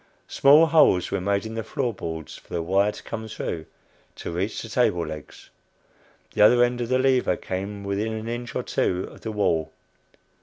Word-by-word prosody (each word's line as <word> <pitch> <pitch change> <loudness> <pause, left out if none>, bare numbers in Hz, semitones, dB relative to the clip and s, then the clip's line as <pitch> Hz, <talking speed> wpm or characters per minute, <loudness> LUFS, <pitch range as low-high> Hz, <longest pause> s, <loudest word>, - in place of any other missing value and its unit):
Small 145 +4 +6
holes 155 - +4
were 100 -1 -1
made 100 +2 0
in 110 - -6
the 115 0 -3
floor 120 +2 -2
boards 80 -5 -6
for - - -17
the 85 - -2
wire 100 +4 +2
to - - -11
come 110 0 -6
through 85 -7 -5 0.5
to - - -6
reach 95 +6 -2
the - - -7
table 95 -8 +1
legs. 75 -2 -10 0.8
The - - 0
other 120 +3 +7
end 120 0 0
of 120 - -3
the 130 - +3
lever 130 -1 +2
came 100 +2 -5
within 100 +3 -2
an 110 0 -5
inch 120 0 -5
or - - -1
two 90 +1 -1
of - - -15
the 110 - -4
wall. 85 -7 0
105 Hz, 195 wpm, -24 LUFS, 90-120 Hz, 0.8 s, other